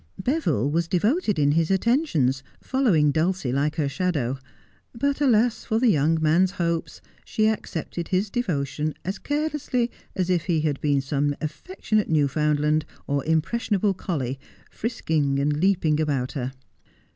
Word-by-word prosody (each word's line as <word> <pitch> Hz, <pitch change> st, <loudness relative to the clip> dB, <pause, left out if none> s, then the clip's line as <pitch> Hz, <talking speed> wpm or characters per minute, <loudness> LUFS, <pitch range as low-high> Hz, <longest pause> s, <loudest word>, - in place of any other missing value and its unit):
Beville 215 Hz, -, 0 dB
was 165 Hz, +2 st, 0 dB
devoted 210 Hz, -, +1 dB
in 145 Hz, -1 st, +3 dB
his 160 Hz, +1 st, +2 dB
attentions, 190 Hz, -, +2 dB, 0.2 s
following 195 Hz, -, +2 dB
Dulcie 165 Hz, -3 st, 0 dB
like 145 Hz, +4 st, 0 dB
her 150 Hz, -4 st, 0 dB
shadow; 140 Hz, -6 st, -1 dB, 0.6 s
but, 280 Hz, +4 st, -1 dB
alas 235 Hz, -3 st, +3 dB
for 220 Hz, -, 0 dB
the 240 Hz, -1 st, +4 dB
young 160 Hz, 0 st, +2 dB
man's 170 Hz, +5 st, +3 dB
hopes, 170 Hz, -3 st, -2 dB, 0.2 s
she 215 Hz, 0 st, +1 dB
accepted 175 Hz, -5 st, -3 dB
his 195 Hz, +2 st, 0 dB
devotion 155 Hz, -, -2 dB
as 190 Hz, +3 st, -3 dB
carelessly 290 Hz, -5 st, -1 dB, 0.2 s
as 185 Hz, -1 st, 0 dB
if 175 Hz, -2 st, +1 dB
he 165 Hz, -4 st, +1 dB
had 150 Hz, -3 st, -1 dB
been 145 Hz, -2 st, +2 dB
some 145 Hz, +1 st, 0 dB
affectionate 215 Hz, -, -2 dB
Newfoundland 150 Hz, 0 st, +2 dB, 0.2 s
or 140 Hz, -1 st, -1 dB
impressionable 195 Hz, +5 st, +1 dB
collie, 140 Hz, -8 st, -3 dB, 0.3 s
frisking 155 Hz, -, -1 dB
and 145 Hz, +1 st, +1 dB
leaping 165 Hz, -4 st, +2 dB
about 140 Hz, -5 st, -1 dB
her. 130 Hz, -3 st, -3 dB
165 Hz, 140 wpm, -24 LUFS, 145-215 Hz, 0.6 s, the